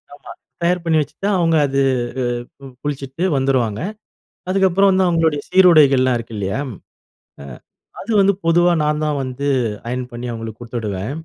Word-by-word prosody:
ஆமா. 145 - -13 0.3
தயார் 175 0 +1
பண்ணி 165 -2 +2
வச்சுட்டா, 150 +7 -4
அவுங்க 165 -1 +2
அது 140 0 0 0.8
அ - - -8
குளிச்சுட்டு 140 +2 -4
வந்துருவாங்க. 125 -6 0 0.7
அதுக்கப்புறம் 195 +1 +3
வந்து 190 0 +2
அவங்களுடைய 165 -4 +1
சீருடைகள் 155 -8 +6
எல்லாம் 130 -1 +2
இருக்கு 115 -1 -8
இல்லையா? 95 +5 -2 0.8
அ - - -9 0.5
அது 230 - -6
வந்து 200 +1 +4
பொதுவா 175 +1 +4
நான் 150 0 0
தான் 150 -1 -1
வந்து 130 +2 -4 0.4
அயன் 125 +1 -3
பண்ணி 120 +1 -6
அவங்களுக்கு 115 -1 -7
குடுத்துடுவேன். 110 -3 -4
145 Hz, 145 wpm, -19 LUFS, 125-170 Hz, 0.8 s, சீருடைகள்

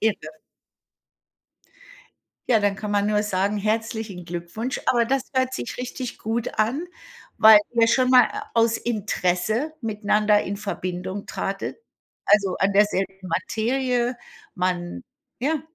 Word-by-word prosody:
Irre. 220 -1 +1 2.3
Ja, 235 - +5
dann 205 -1 +1
kann 210 +1 -5
man 205 0 +1
nur 210 0 +2
sagen, 200 0 0
herzlichen 215 -2 -2
Glückwunsch. 175 +9 -4
Aber 240 -2 +3
das 265 +2 0
hört 260 -1 0
sich - - -5
richtig 250 0 -5
gut 225 +1 -3
an, 245 +10 +1 0.5
weil 220 -1 +9
ihr 230 -1 +4
schon 255 +2 +3
mal, 255 -1 +8
äh, 420 0 -5
aus 230 0 +3
Interesse 215 - -1
miteinander 210 -2 +2
in 200 +1 -4
Verbindung 185 -1 -5
tratet, 195 +1 -4 0.5
also, 200 -3 +3
an 195 +1 +2
derselben 195 -2 +1
Materie 245 +6 0 0.4
man 180 +3 -2 0.4
ja. 300 +3 0
215 Hz, 125 wpm, -24 LUFS, 195-240 Hz, 2.3 s, weil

